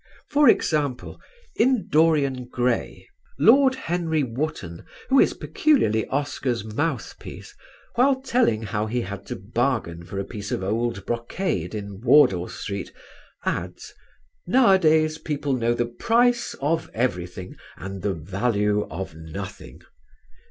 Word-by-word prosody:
For 295 -3 +6
example, 145 - 0 0.3
in 250 -1 +2
"Dorian 145 -5 +2
Gray" 125 -1 -2 0.3
Lord 260 - +5
Henry 170 - -1
Wotton, 115 - -4 0.3
who 270 0 +5
is - - +4
peculiarly 180 - +1
Oscar's 135 -5 -2
mouthpiece, 145 +10 -4 0.4
while 265 +2 +3
telling 245 - +1
how 105 0 -2
he 120 +3 -1
had 100 -1 -7
to - - -4
bargain 110 -5 -2
for 95 +3 -8
a 100 - -1
piece 100 -3 -7
of - - -2
old 110 0 -2
brocade 115 - -2
in 100 -1 -7
Wardour 120 -9 +5
Street, 100 -1 -5 0.5
adds, - - -4 0.5
"nowadays 160 -9 +4
people 145 -2 -2
know 120 -2 +1
the 120 - 0
price 235 - +1
of 160 +4 0
everything 90 -6 -3 0.2
and 95 +1 -7
the 100 0 -1
value 105 +4 0
of 90 +1 -6
nothing." 80 +5 -9
120 Hz, 125 wpm, -24 LUFS, 100-160 Hz, 0.5 s, For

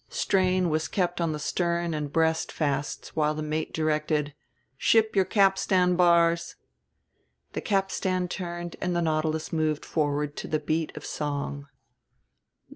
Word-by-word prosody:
Strain 185 -2 +1
was 155 +1 0
kept 175 -2 -1
on 165 -1 +1
the 155 - -3
stern 170 +2 -1
and 150 -2 -3
breast 160 0 +1
fasts 145 -2 -2
while 155 -1 +1
the 155 - -3
mate 155 +1 -2
directed: 150 -1 0 0.4
"Ship 220 +9 +3
your 190 -1 +4
capstan 190 -2 +3
bars." 170 -1 +3 1.0
The - - -3
capstan 190 -2 0
turned 175 -1 -5
and 180 -1 -1
the 170 - +1
Nautilus 155 0 -1
moved 155 -2 0
forward 145 -1 -1
to - - -5
the 155 - 0
beat 155 +1 -1
of - - -7
song. 145 -1 -4
160 Hz, 140 wpm, -27 LUFS, 155-180 Hz, 1.0 s, your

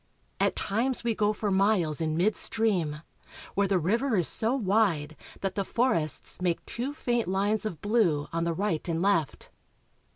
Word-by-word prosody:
At - - +2
times 235 +6 -1
we 235 -1 +1
go 210 -1 +1
for 210 -1 -2
miles 190 -6 +2
in 155 -1 -1
mid 200 +5 +2
stream, 175 -9 0 0.5
where 200 0 +2
the 195 -1 +2
river 225 - +1
is 175 -5 +3
so 225 +4 +1
wide 190 - +1 0.3
that 195 -1 -1
the 200 - -1
forests 180 - -1
make 175 -2 -1
two 250 +4 -3
faint 240 -5 -1
lines 200 +3 0
of 170 -7 -7
blue 205 -9 +2
on 165 0 0
the 170 0 0
right 180 -3 -2
and 165 -1 0
left. 180 -8 0
195 Hz, 170 wpm, -28 LUFS, 165-220 Hz, 0.5 s, is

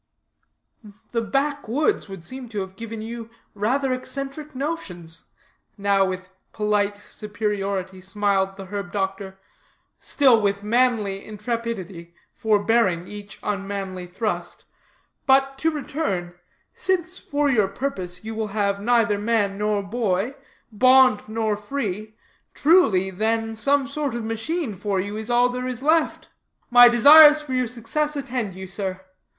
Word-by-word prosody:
"The 230 - 0
back 275 +6 -1
woods 295 - 0
would 190 -3 -9
seem 255 +3 -7
to 210 -3 -3
have 190 0 -7
given 225 +1 -7
you 230 0 -7 0.2
rather 255 +6 0
eccentric 275 +3 -6
notions," 180 - -5 0.5
now 200 -1 +2
with 185 0 -5 0.2
polite 205 -1 0
superiority 200 -3 -4
smiled 195 0 0
the 195 - -8
herb 200 -2 -5
doctor, 195 -1 -3 0.6
still 255 -6 +4
with 200 0 0
manly 215 -4 +1
intrepidity 210 -6 -5 0.2
forbearing 210 -4 +2
each 205 0 -9
unmanly 195 -3 -4
thrust, 210 +5 -4 0.6
"but 270 0 +3
to 320 - +2
return; 275 - -3 0.4
since, 365 -1 -1
for 290 0 -1
your 220 -8 +3
purpose, 190 -5 -4
you 225 - -4
will 220 -1 -2
have 200 -1 0
neither 230 -2 +2
man 205 -2 +1
nor 210 -1 0
boy, 205 +1 -1 0.4
bond 255 0 +5
nor 220 -1 0
free, 215 -2 -4 0.4
truly, 225 - +4
then 225 +3 -1
some 275 +4 +1
sort 280 -3 -3
of 235 - -3
machine 225 +5 -3
for 195 0 -2
you 205 +2 -3
is 220 +1 -6
all 240 +1 +4
there 250 0 -4
is 255 0 -4
left. 315 +1 +1 0.4
My 245 0 +9
desires 295 +5 +9
for 270 -3 -6
your 255 -1 +1
success 250 +6 -2
attend 245 -8 -3
you, 190 0 -7
sir. 190 0 -5
220 Hz, 135 wpm, -23 LUFS, 195-255 Hz, 0.6 s, My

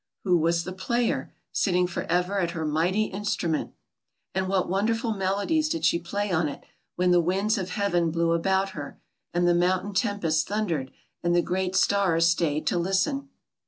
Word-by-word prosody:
Who 180 -3 +3
was 170 +1 +1
the 185 - -6
player, 235 +6 -1 0.2
sitting 180 -2 +2
forever 180 +2 -1
at 170 -2 -2
her 160 - -2
mighty 170 +7 +1
instrument? 195 -6 -2 0.6
And 190 0 -1
what 190 -1 +1
wonderful 225 +4 0
melodies 205 - 0
did 325 0 -1
she 170 - +3
play 200 +4 -3
on 160 -3 +1
ii 140 - -7 0.4
when 180 0 +2
the 175 -1 +5
winds 195 +6 +1
of 185 -1 -4
heaven 175 -4 +1
blew 165 +1 +1
about 190 +3 +1
her 145 -5 -8 0.3
and 175 0 +1
the 175 - +5
mountain 185 +3 +1
tempest 185 -7 0
thundered 175 -10 -1 0.3
and 175 0 +1
the 175 - +3
great 185 0 -1
stars 190 -5 +3
stayed 165 -3 +1
to 175 - +1
listen? 195 +11 0
180 Hz, 170 wpm, -26 LUFS, 170-200 Hz, 0.6 s, the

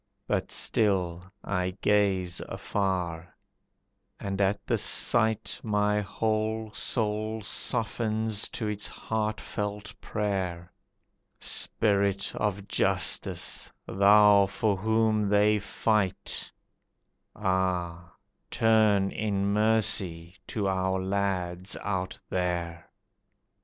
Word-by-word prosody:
But - - -1
still 95 -3 0
I 90 -1 -2
gaze 95 -4 +1
afar, 90 -4 -2 0.8
and 100 0 -3
at 100 +1 0
the - - 0
sight 110 -2 +2
My 105 -1 +1
whole 110 +1 -2
soul 110 -1 -1
softens 110 -1 -1
to 110 - -4
its 105 0 -3
heart 110 -1 -3
felt 105 0 -5
prayer, 95 -4 -3 0.7
"Spirit 100 -2 +1
of 100 -1 -2
Justice, - - +1 0.2
Thou 100 0 +6
for 105 +1 0
whom 110 +1 +1
they 105 +1 +4
fight, 105 -1 -1 0.8
Ah, 90 -3 -1 0.4
turn 110 -4 +3
in 100 -2 -1
mercy 100 -6 +1
to 105 -3 -2
our 95 0 0
lads 95 -1 -2
out 95 -2 -2
there! 85 -2 -3
100 Hz, 90 wpm, -28 LUFS, 95-105 Hz, 0.8 s, Thou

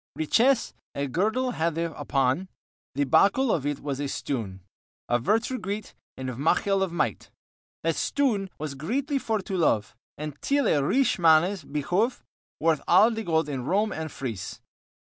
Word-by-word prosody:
Richesse 235 - +2 0.2
a 140 - -1
girdle 220 - 0
hadde 165 -3 -1
upon 135 +6 0 0.5
The 145 +1 +1
bokel 215 - +4
of 145 -3 -1
it 145 -1 -2
was 140 -2 -3
of 145 - -1
a - - -6
stoon 105 -11 -4 0.5
Of 120 0 +1
Vertue 225 - +1
greet, 205 +2 -5 0.2
and 130 - -5
mochel 195 +6 +2
of 190 -2 0
might. 170 - -2 0.5
That - - +2
stoon 230 -9 0
was 150 -2 -4
greetly 260 - -1
for 220 -4 -1
to 195 - -4
love, 115 - +1 0.2
And 150 -1 -6
til 280 0 +1
a 145 -2 +3
riche 260 - +2
mannes 170 +2 +4
bihove 175 - -1 0.4
Worth 160 -2 +2
al 210 +6 +6
the 225 -1 -3
gold 160 -4 +1
in 135 -4 -3
Rome 205 +7 +1
and 160 0 -4
Fryse. 115 -10 -6
170 Hz, 160 wpm, -26 LUFS, 145-220 Hz, 0.5 s, al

